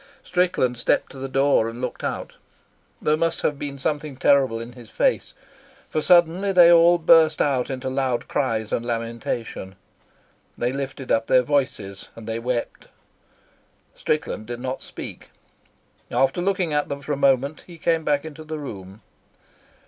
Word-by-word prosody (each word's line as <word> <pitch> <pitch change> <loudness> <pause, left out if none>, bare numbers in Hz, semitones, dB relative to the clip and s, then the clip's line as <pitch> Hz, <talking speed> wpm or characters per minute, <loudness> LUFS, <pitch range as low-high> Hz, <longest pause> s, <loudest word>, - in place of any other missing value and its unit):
Strickland 180 -10 0
stepped - - +1
to 135 - -11
the 135 0 -5
door 135 -4 +2
and 115 +1 -9
looked 125 -1 -5
out. - - -4 0.7
There 150 - +2
must 165 +1 -1
have 145 -2 0
been 140 -1 -5
something 145 0 -3
terrible 135 -4 +3
in 115 +1 -8
his 120 -3 -13
face, - - 0 0.6
for 155 - 0
suddenly 175 +3 +4
they 175 -2 +7
all 170 +1 +6
burst 160 -1 +5
out 135 -3 +1
into 130 -1 -4
loud 130 -2 -1
cries 110 -5 -1
and 115 - -1
lamentation. 115 -4 -4 0.8
They 120 +2 -1
lifted 135 -1 -5
up 115 0 +2
their 130 -1 +4
voices 125 -9 -2
and 115 - -10
they 115 +1 -3
wept. 120 0 -3 1.1
Strickland 150 -8 -2
did 120 0 -5
not 130 +1 -4
speak. - - -9 0.8
After 135 +6 +1
looking 185 -4 0
at 145 0 0
them 140 0 -4
for 145 - -3
a - - 0
moment, 140 +1 +1
he 175 -2 -12
came 165 0 +1
back 145 0 0
into 155 0 -9
the 155 0 -5
room. 100 -8 -9
135 Hz, 160 wpm, -23 LUFS, 120-155 Hz, 1.1 s, they